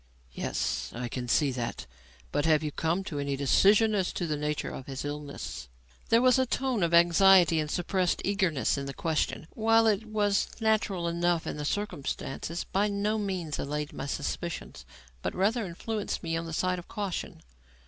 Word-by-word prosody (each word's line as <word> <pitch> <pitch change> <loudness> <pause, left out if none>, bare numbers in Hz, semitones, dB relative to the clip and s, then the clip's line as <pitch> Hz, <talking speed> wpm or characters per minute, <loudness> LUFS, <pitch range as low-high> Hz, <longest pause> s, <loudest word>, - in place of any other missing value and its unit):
"Yes, - - -2
I 120 +1 -3
can 125 0 -5
see 140 +3 +3
that. 120 - -4 0.5
But 145 - +1
have 155 -1 +4
you 150 - -2
come 165 +6 -1
to 150 -6 -5
any 140 -1 -1
decision 200 - +4
as 190 -3 +1
to 175 - -2
the 155 -2 -1
nature 150 0 -2
of 130 - -8
his 135 0 -5
illness?" 140 - -6 0.4
There 230 +2 +5
was 255 +1 +5
a 260 - +2
tone 255 -3 0
of 170 -1 +2
anxiety 175 0 +6
and 155 -1 -2
suppressed 180 +2 0
eagerness 185 -9 +1
in 140 - -5
the 140 - -6
question 160 -2 -1
which, - - -16
while 225 0 +4
it 220 0 +2
was 205 -2 +1
natural 215 -5 +1
enough 170 0 +1
in - - -4
the 150 - -4
circumstances, 165 -3 -3
by 200 +2 0
no 210 +2 0
means 185 -7 -3
allayed 150 +2 -3
my 140 - -5
suspicions, 155 +4 -4 0.4
but - - -3
rather 210 +3 +1
influenced 210 +5 -4
me 165 -1 -1
on 165 0 -3
the - - -6
side 185 +2 0
of 175 - -12
caution. 200 -5 -4
170 Hz, 185 wpm, -29 LUFS, 150-205 Hz, 0.5 s, anxiety